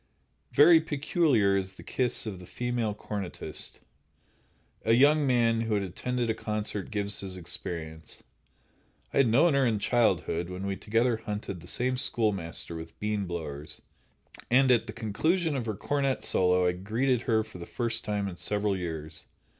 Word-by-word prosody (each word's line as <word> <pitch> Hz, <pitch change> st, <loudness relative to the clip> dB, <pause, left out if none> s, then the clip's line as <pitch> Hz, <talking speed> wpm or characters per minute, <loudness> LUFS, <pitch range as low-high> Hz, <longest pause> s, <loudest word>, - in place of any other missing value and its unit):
Very 160 Hz, +6 st, +7 dB
peculiar 145 Hz, -, +2 dB
is 95 Hz, -1 st, -2 dB
the -, -, -12 dB
kiss 125 Hz, -2 st, +1 dB
of 100 Hz, -4 st, -5 dB
the 90 Hz, -, -12 dB
female 120 Hz, -3 st, -2 dB
cornetist. 100 Hz, -4 st, -5 dB, 1.0 s
A 115 Hz, -, +3 dB
young 145 Hz, +4 st, +5 dB
man 115 Hz, -3 st, +3 dB
who 110 Hz, -2 st, 0 dB
had 100 Hz, -, 0 dB
attended 120 Hz, +6 st, -2 dB
a 110 Hz, -, +1 dB
concert 105 Hz, -2 st, -3 dB
gives 100 Hz, -1 st, -1 dB
his 95 Hz, -2 st, -5 dB
experience. 80 Hz, -2 st, -5 dB, 0.9 s
"I -, -, -1 dB
had 135 Hz, -3 st, +5 dB
known 140 Hz, +9 st, +4 dB
her 140 Hz, 0 st, +3 dB
in 115 Hz, -4 st, +2 dB
childhood, 95 Hz, -6 st, +1 dB
when 90 Hz, +1 st, -5 dB
we 100 Hz, 0 st, -1 dB
together 115 Hz, +3 st, +1 dB
hunted 105 Hz, -4 st, -5 dB
the 85 Hz, -, -13 dB
same 130 Hz, +6 st, +1 dB
schoolmaster 100 Hz, -10 st, -2 dB
with 80 Hz, 0 st, -9 dB
bean 105 Hz, -2 st, -1 dB
blowers, 75 Hz, -3 st, -6 dB, 0.7 s
and 130 Hz, +1 st, +5 dB
at 115 Hz, -1 st, +3 dB
the 110 Hz, -, -6 dB
conclusion 150 Hz, -, 0 dB
of 120 Hz, -4 st, -3 dB
her 110 Hz, -, -2 dB
cornet 140 Hz, +4 st, -1 dB
solo 90 Hz, 0 st, +3 dB
I 90 Hz, -, +4 dB
greeted 110 Hz, +8 st, 0 dB
her 110 Hz, -1 st, +3 dB
for 105 Hz, -4 st, -12 dB
the 85 Hz, -, -8 dB
first 115 Hz, -2 st, -2 dB
time 105 Hz, -1 st, -1 dB
in 90 Hz, -2 st, -6 dB
several 105 Hz, 0 st, 0 dB
years. 80 Hz, -4 st, -5 dB
105 Hz, 165 wpm, -28 LUFS, 95-125 Hz, 1.0 s, Very